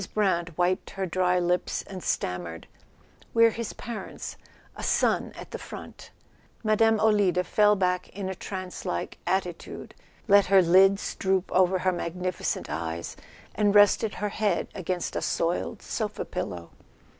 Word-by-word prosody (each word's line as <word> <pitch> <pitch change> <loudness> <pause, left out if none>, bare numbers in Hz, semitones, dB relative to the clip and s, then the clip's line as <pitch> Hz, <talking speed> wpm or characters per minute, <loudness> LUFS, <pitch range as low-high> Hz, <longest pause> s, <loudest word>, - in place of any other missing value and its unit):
Brant 175 -6 +1
wiped 180 +1 +1
her 195 -1 -3
dry 180 0 +1
lips 180 0 0
and 190 -2 -8
stammered: 85 - -3 0.7
"We're 230 0 +6
his 230 0 -5
parents—a 235 -3 -9
son - - +1
at - - -10
the - - -5
front.. - - -10 0.3
." - - -33
Mme. 220 0 +4
Olida 205 -4 +3
fell 210 +2 +4
back 180 -2 0
in 195 -1 -5
a 190 - -2
trance 185 0 -6
like 85 - -4
attitude, 180 -3 -3 0.3
let 200 -1 +6
her 190 0 +6
lips 195 +3 +4
droop 190 -1 0
over 185 0 +4
her 185 0 +1
magnificent 180 +1 -3
eyes, 80 +2 -4 0.4
and 205 -1 +2
rested 205 +1 +5
her 210 - -2
head 205 -3 0
against 180 -1 -3
a - - -1
soiled 170 +1 -1
sofa - - -3
pillow. 85 -1 -5
185 Hz, 145 wpm, -27 LUFS, 175-205 Hz, 0.7 s, We're